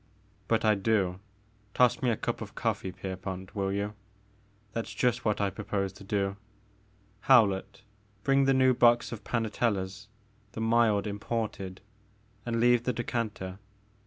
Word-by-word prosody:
But 115 -1 +1
I 110 - +6
do, 95 -3 +1 0.3
— 105 -1 -35
toss 125 +5 +4
me 130 - +2
a 115 - +1
cup - - -3
of - - -8
coffee, 95 - -1
Pierpont, 95 0 -6
will 95 -2 -1
you, 100 +1 -2 0.4
— 105 0 -34
^that 115 - -1
*s - - -9
just 125 0 +1
what 105 -2 +1
I 100 -1 +1
propose 100 -1 -3
to 100 - -13
do. 100 0 -1 0.8
Howlett, 105 -5 +3 0.4
bring 135 0 +3
the 135 - +4
new 130 0 +5
box 120 -1 +4
of 115 -3 -7
Panatella's, 105 -4 -1 0.2
— 105 -1 -35
the - - -6
mild 115 -2 +3
imported; 105 -2 -4 0.3
— 105 0 -35
^and 115 -1 0
leave 120 0 +4
the 125 - +1
decanter. 110 -6 -3
105 Hz, 160 wpm, -29 LUFS, 100-115 Hz, 0.8 s, I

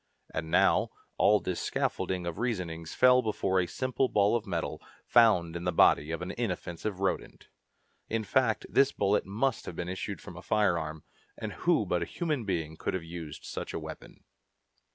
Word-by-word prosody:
And 80 0 -3
now, - - +4 0.3
all 105 0 +5
this 90 -2 -3
scaffolding 90 -2 -1
of 85 -2 -4
reasonings 90 -9 -3
fell 125 0 +6
before 95 -4 0
a 90 - +1
simple 130 +3 -1
ball 105 +2 +3
of 115 -3 -2
metal, 85 -4 -3 0.2
found 95 -9 +4
in 85 - -4
the 90 - +1
body 75 -3 +4
of 85 +2 -3
an 90 - -4
inoffensive 95 -3 -3
rodent! 95 - -2 0.6
In 115 0 0
fact, 115 0 +1
this 135 0 +4
bullet 100 -1 +1
must 115 +6 -1
have 85 - -6
issued 90 +2 -4
from - - -10
a - - -8
firearm, 85 -7 0 0.3
and - - -5
who - - +2
but - - 0
a - - 0
human 150 -9 -2
being 80 -5 -2
could - - -2
have 90 - -3
used 80 -3 -8
such - - -5
a - - -1
weapon? - - -10
95 Hz, 175 wpm, -30 LUFS, 85-115 Hz, 0.6 s, fell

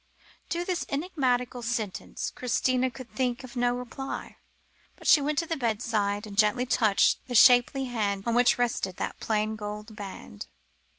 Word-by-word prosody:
To 345 +1 -2
this 360 -2 -1
enigmatical 260 -6 -1
sentence 225 -4 -3
Christina 255 +1 +1
could 250 0 -11
think 255 -1 -1
of 255 0 -11
no 245 0 +1
reply, 250 +2 -6 0.6
but - - -16
she 300 - +6
went 295 +1 -1
to 335 - +1
the 330 - -2
bedside, 215 -4 -1
and 205 -2 -9
gently 215 +4 +3
touched 220 -5 +3
the 245 - -4
shapely 250 +3 +6
hand 205 -5 -2
on 235 - 0
which 245 +1 +4
rested 235 -6 -1
that - - -4
plain 215 0 -1
gold 210 +1 -7
ring. 190 - -9
245 Hz, 160 wpm, -27 LUFS, 215-255 Hz, 0.6 s, she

